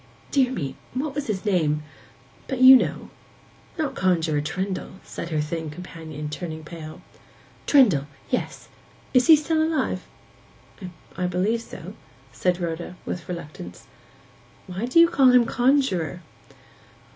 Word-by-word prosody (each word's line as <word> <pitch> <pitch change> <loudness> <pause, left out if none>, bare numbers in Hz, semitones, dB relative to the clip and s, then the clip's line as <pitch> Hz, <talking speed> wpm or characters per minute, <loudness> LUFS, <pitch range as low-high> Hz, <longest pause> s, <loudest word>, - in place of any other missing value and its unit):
Dear 260 -3 +3
me—what 260 - -5
was 290 0 -4
his 200 -3 -3
name? 155 -7 +1 0.6
But 265 -3 -3
you 260 +1 +10
know.' 255 - 0 0.7
'Not 310 -4 -1
Conjuror 165 -5 +1
Trendle?' 185 +6 -4
said 170 - -7
her 155 -2 -1
thin 160 +1 -3
companion, 155 -2 -8
turning 160 +1 -6
pale. 155 -1 -9 0.6
'Trendle—yes. 150 - +1 0.4
Is 250 +1 +4
he 315 -2 +8
alive?' 315 -3 0 1.1
'I 180 - -1
believe 195 +6 0
so,' - - -10 0.4
said 180 -1 0
Rhoda, 170 +1 -4
with 175 - -5
reluctance. 150 - -8 0.8
'Why 185 +5 -4
do 295 +7 +4
you 335 - +8
call 275 -6 +4
him 245 -1 +6
conjuror? 235 - +1
180 Hz, 120 wpm, -24 LUFS, 160-255 Hz, 1.1 s, you